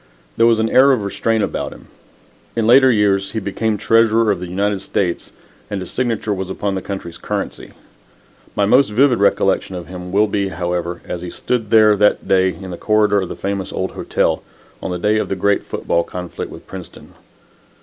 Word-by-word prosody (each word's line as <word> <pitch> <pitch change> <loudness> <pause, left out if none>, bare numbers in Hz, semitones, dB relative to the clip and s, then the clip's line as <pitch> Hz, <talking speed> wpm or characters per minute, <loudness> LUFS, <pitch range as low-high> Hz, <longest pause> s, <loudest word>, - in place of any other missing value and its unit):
There 115 - +4
was 115 -1 +4
an 110 0 +1
air 135 +2 +6
of 115 -5 -1
restraint 110 +2 0
upon - - -3
him. - - -15 0.7
In 115 -1 0
later 130 +3 +6
years 100 -3 +1
he 110 - -1
became 105 +2 -2
Treasurer 115 +1 +3
of 100 - -1
the 90 - -6
United 100 +1 -1
States 90 -3 -2 0.4
and 100 - -3
his 90 - -7
signature 115 -4 -1
was 95 -1 -4
upon 100 +1 -2
the 95 - -3
country's 90 -3 -7
currency. - - -5 0.8
My 100 - +2
most 125 +5 +4
vivid 125 +2 +3
recollection 100 -1 +1
of 90 -1 -6
him 90 +1 -8
will 105 +3 +4
be, 100 -1 -1
however, 85 -1 -3
as 90 - -4
he 90 - -6
stood 115 0 -2
there 110 -1 +6
that 105 +1 +2
day 95 -1 +3
in 95 0 -7
the 85 - -6
corridor 105 -2 +2
of 95 - -5
the - - -5
famous 100 -1 -3
old - - -3
hotel, - - -1 0.4
on - - -4
the 90 - -2
day 105 +4 +1
of - - -3
a - - +1
great 100 +2 +1
football 85 - 0
conflict 90 0 -7
with - - -11
Princeton. - - -11
100 Hz, 200 wpm, -19 LUFS, 95-110 Hz, 0.8 s, air